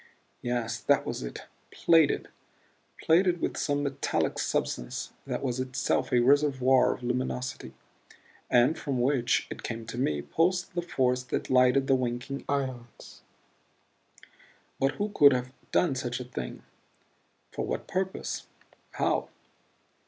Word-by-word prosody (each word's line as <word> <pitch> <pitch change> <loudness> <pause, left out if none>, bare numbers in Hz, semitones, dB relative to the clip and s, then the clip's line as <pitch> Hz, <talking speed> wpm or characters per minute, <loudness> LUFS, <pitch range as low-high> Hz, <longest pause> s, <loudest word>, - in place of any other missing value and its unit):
Yes, 120 -1 -2
that - - +2
was - - -4
it - - -6 0.3
plated. 165 -3 +3 0.7
Plated 175 +1 +4
with - - -2
some 145 -1 0
metallic 140 -1 -1
substance - - -2
that - - -3
was 130 -2 -1
itself 130 0 -1
a 125 - +4
reservoir 135 -1 +4
of 125 - -14
luminosity 125 - -3 0.7
and 125 +6 +4
from 135 -4 -2
which, 125 -1 +2
it - - -6
came 115 -1 -5
to 120 +2 -6
me, 75 - 0
pulsed 180 +3 0
the 175 - -1
force 130 -7 0
that 125 - -3
lighted 130 +1 +5
the 135 - +3
winking 125 +2 -2
ions. 130 -4 -4 1.6
But 135 +1 +2
who 205 +1 -2
could 145 -8 +6
have 125 0 -3 0.2
done 170 -6 +3
such 125 -1 -3
a - - -4
thing? 120 - -7 0.9
For - - -3
what - - -3
purpose? 190 0 -3 0.5
How? - - 0
130 Hz, 130 wpm, -28 LUFS, 125-145 Hz, 1.6 s, could